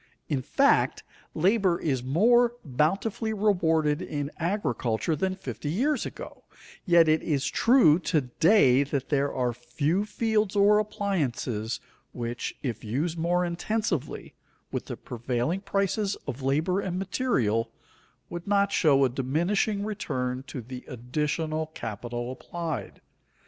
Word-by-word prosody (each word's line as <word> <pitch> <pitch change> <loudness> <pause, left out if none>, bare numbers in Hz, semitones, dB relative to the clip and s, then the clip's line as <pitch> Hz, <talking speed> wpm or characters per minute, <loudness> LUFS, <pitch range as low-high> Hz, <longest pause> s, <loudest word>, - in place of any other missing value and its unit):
In 140 -4 -1
fact, 275 - +2 0.3
labor 185 +1 +2
is 135 -6 -1
more 235 - +4
bountifully 195 - 0
rewarded 165 -7 +2
in 145 -4 -4
agriculture 160 - -1
than 185 +4 -1
fifty 170 -5 -6
years 265 - 0
ago, - - -10 0.4
yet 170 -2 +6
it 155 0 +3
is 145 -3 -1
true 175 - +5
to 165 -4 +1
day 135 - +4
that 140 -1 -2
there 140 -1 +1
are 125 -2 -1
few 140 - -1
fields 215 -1 0
or 205 +1 +5
appliances 145 - -2 0.3
which, 120 0 -4
if 115 -5 -3
used 150 +10 -2
more 175 +2 +1
intensively 175 - -2 0.4
with - - -3
the - - -5
prevailing 125 +9 -2
prices 200 +1 0
of 140 -1 -5
labor 155 +8 +1
and 185 -3 -3
material, 125 - 0 0.6
would 175 +1 -7
not 200 0 +2
show 140 -7 +4
a - - +1
diminishing 175 - 0
return 130 -12 -3
to 130 - -6
the 125 +2 -8
additional 150 +6 -2
capital 120 +3 -5
applied. 165 +4 -5
160 Hz, 130 wpm, -27 LUFS, 130-200 Hz, 0.6 s, yet